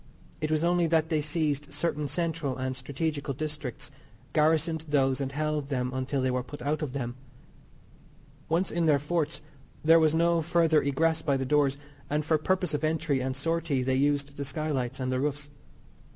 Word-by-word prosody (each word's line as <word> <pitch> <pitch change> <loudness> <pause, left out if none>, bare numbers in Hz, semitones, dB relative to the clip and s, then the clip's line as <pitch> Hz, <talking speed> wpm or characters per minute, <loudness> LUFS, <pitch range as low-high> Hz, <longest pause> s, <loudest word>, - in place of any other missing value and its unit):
It 155 - 0
was 155 0 +1
only 175 0 +3
that 160 -1 +2
they 155 -2 +1
seized 150 -1 -1
certain 150 -3 -1
central 155 -3 -2
and 130 0 -2
stragetical 140 +2 -3
districts, 150 -4 -5 0.4
garrisoned 160 +1 +2
those 135 -2 +2
and 135 -1 -2
held 150 0 -1
them 125 -2 -1
until 130 +1 -1
they 130 - +2
were 125 0 0
put 125 +4 -9
out 150 +2 0
of 145 -5 -3
them. 120 -4 -3 1.4
Once 170 +4 +1
in 170 -1 +1
their 150 -2 +5
forts 155 +2 -1 0.4
there 165 +1 +7
was 160 -1 +3
no 170 0 +3
further 165 -1 +3
egress 160 +4 +1
by 140 -3 +1
the 135 - -2
doors, 140 0 +2 0.3
and 150 +1 0
for 155 -1 +2
purpose 185 +1 0
of 150 +1 -1
entry 155 -3 +1
and 130 +1 -2
sortie 165 -2 0
they 130 +1 +1
used 140 +1 +1
the 140 - -2
skylights 135 -2 -2
and 130 0 -1
the 130 - 0
roofs. 145 +1 -2
150 Hz, 180 wpm, -28 LUFS, 135-160 Hz, 1.4 s, there